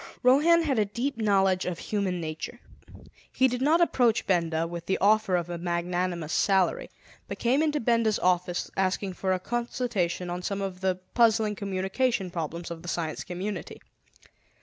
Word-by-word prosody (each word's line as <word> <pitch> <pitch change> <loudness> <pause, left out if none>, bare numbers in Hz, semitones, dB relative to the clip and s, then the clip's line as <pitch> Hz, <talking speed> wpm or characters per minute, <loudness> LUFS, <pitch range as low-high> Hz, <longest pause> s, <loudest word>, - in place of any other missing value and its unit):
Rohan 310 +7 +5
had 270 -7 +1
a 210 - +3
deep 245 +7 -3
knowledge 195 -4 +2
of 180 -2 -2
human 195 -3 -2
nature. 160 +9 -6 0.7
He 260 - +3
did 250 0 -3
not 315 +5 +4
approach 245 -9 +2
Benda 165 -3 +1
with 170 0 -7
the 190 - +1
offer 205 -2 +3
of 175 -1 -1
a 175 -1 -5
magnanimous 175 -1 -2
salary, 200 - +2 0.4
but - - -5
came 255 +5 +2
into 300 -1 +1
Benda's 230 -3 +2
office 180 0 0
asking 190 0 0
for 190 +1 -2
a 185 - +1
consultation 225 -6 -2
on 175 +1 -4
some 200 +2 -3
of 190 -2 -4
the 190 -1 +1 0.2
puzzling 225 -2 +3
communication 195 +1 -1
problems 170 +1 -5
of 165 -1 -7
the 175 - -11
Science 160 -3 -3
Community. 185 +1 -5
190 Hz, 165 wpm, -27 LUFS, 175-235 Hz, 0.7 s, Rohan